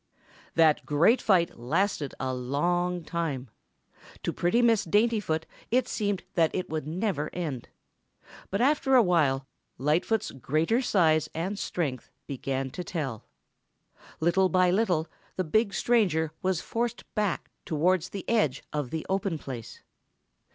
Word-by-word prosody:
That 160 -2 +4
great 165 - +3
fight 175 - +2
lasted 145 - 0
a 130 -1 -1
long 175 +8 0
time. 150 -8 -3 0.7
To - - -1
pretty 225 +8 +2
Miss 230 -3 +4
Daintyfoot 205 -4 +1 0.3
it 250 +1 +2
seemed 205 -6 -1
that 165 -2 +3
it 185 - -3 0.2
never 175 -1 -1
would - - -10
end. 150 -9 -4 0.8
But 195 - -1
after 270 0 +3
a 245 - +7
while 145 -8 +2 0.3
Lightfoot's 165 - +1
greater 155 - 0
size 160 - +3
and 190 +5 -2
strength 140 -11 -3 0.2
began 135 -1 -3
to 180 - -5
tell. 150 - -4 0.9
Little 175 +3 +3
by 185 -1 +4
little 180 -5 +1 0.3
the 185 - 0
big 205 +6 +2
stranger 185 -9 +2
was 185 -3 0
forced 235 +1 -2
back 210 -4 -1
towards 170 +3 +1
the 195 - -7
edge 155 - +1
of 145 -4 -2
the 160 +2 -4
open 190 -3 -1
place. 125 -6 -8
175 Hz, 135 wpm, -28 LUFS, 150-200 Hz, 0.9 s, a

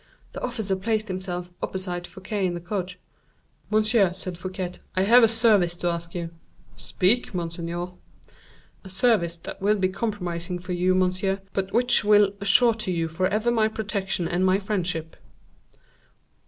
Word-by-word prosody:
The - - -6
officer 220 -6 -2
placed 215 +2 -1
himself 180 -1 -4
opposite 180 -2 -3
Fouquet 195 +1 -5
in 175 - -3
the - - -4
coach. 180 0 -4 0.7
"Monsieur," 215 -3 +3
said 185 -1 -6
Fouquet, 185 0 -5 0.2
"I 185 - +2
have 235 +5 +7
a 225 - +7
service 215 -6 +3
to 175 0 -1
ask 170 0 -5
of - - -18
you." 170 -1 -3 0.5
"Speak, 205 +2 +1
monseigneur." 170 +1 -4 0.9
"A 190 - -11
service 185 -4 +1
that 170 - -9
will 205 +2 +3
be 190 -2 +1
compromising 180 -4 -3
for 180 +1 -8
you, 180 +1 +2
monsieur, 185 +1 0
but 195 0 -2
which 245 +1 +4
will 205 -1 +5
assure 230 +4 +6
to 215 -4 -3
you 165 -2 -1
forever 190 +8 0
my 220 -2 +3
protection 200 -5 -2
and 175 +2 0
my 185 0 +4
friendship." 180 -5 -2
190 Hz, 155 wpm, -25 LUFS, 175-210 Hz, 0.9 s, have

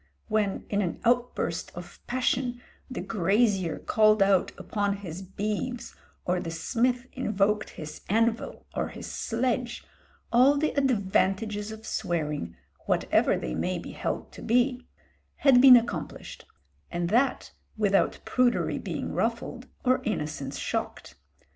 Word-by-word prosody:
When, 210 -2 0
in 205 0 0
an 180 -4 -2
outburst 245 +1 0
of - - -10
passion, 250 0 0 0.3
the 255 - -4
grazier 195 -2 +1
called 215 -1 +4
out 195 -2 +3
upon 205 -1 -1
his 185 -3 -7
beeves, 210 +6 -4 0.3
or 180 0 +1
the 175 -2 -4
smith 245 +9 0
invoked 210 -3 0
his 155 -1 -9
anvil 225 +2 0
or - - 0
his - - -8
sledge, 240 +1 -2 0.5
all 260 +4 +6
the 310 +2 +1
advantages 210 -4 +1
of 220 0 -9
swearing, 150 - -2 0.3
whatever - - +2
they 60 - -4
may - - -1
be - - -7
held - - -4
to - - -11
be, 250 +2 +1 0.5
had 265 -3 +5
been 255 -2 +10
accomplished, 235 - -4 0.4
and 170 0 -2
that 245 +7 +1 0.3
without 200 -2 +2
prudery 250 -1 +1
being - - -4
ruffled 235 +2 -2 0.2
or 255 +1 +3
innocence 150 -8 -3
shocked. - - -4
215 Hz, 130 wpm, -27 LUFS, 190-245 Hz, 0.5 s, been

